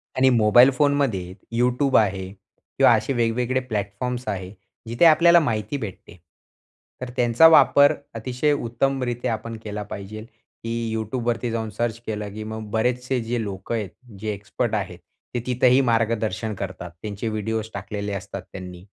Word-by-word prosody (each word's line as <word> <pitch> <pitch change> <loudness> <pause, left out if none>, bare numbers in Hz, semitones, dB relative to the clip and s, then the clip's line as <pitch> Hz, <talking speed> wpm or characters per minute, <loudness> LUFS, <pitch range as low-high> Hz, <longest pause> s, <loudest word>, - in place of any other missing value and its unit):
आणि 130 0 +4
मोबाईल 120 +2 +6
फोनमध्ये 130 -10 0 0.2
YouTube 125 +3 +2
आहे 95 -3 -1 0.5
किंवा - - +6
असे 110 +4 0
वेगवेगळे 125 +2 0
प्लॅटफॉर्म्स 120 +1 -4
आहे, 95 -3 -4 0.4
जिथे 120 +8 +2
आपल्याला 170 +2 +7
माहिती 110 - -2
भेटते. 95 -6 -8 0.8
तर 130 - -4
त्यांचा 120 +6 +6
वापर 145 -2 +6 0.2
अतिशय 125 +6 -1
उत्तमरीत्या 120 -2 -1
आपण 115 +1 -6
केला 105 -1 -5
पाहिजे. 105 +2 -8 0.4
की 115 0 -3
YouTubeवरती 115 +1 -2
जाऊन 110 -1 -2
सर्च 115 +2 -2
केलं, 105 -1 -3
की 110 - -6
मग 110 0 -7
बरेचसे 125 +3 0
जे 120 +1 -2
लोकं 100 +2 -5
आहेत, 105 -4 -3 0.3
जे 110 +1 -3
एक्सपर्ट 100 +1 -3
आहेत, - - -4 0.3
ते 120 - -1
तिथेही 125 +1 +4
मार्गदर्शन 110 -1 0
करतात. 90 -2 -6
त्यांचे 105 +1 -5
व्हिडिओज 110 +1 -3
टाकलेले 100 -1 -5
असतात 100 0 -6
त्यांनी. 90 -1 -9
115 Hz, 140 wpm, -23 LUFS, 105-125 Hz, 0.8 s, आपल्याला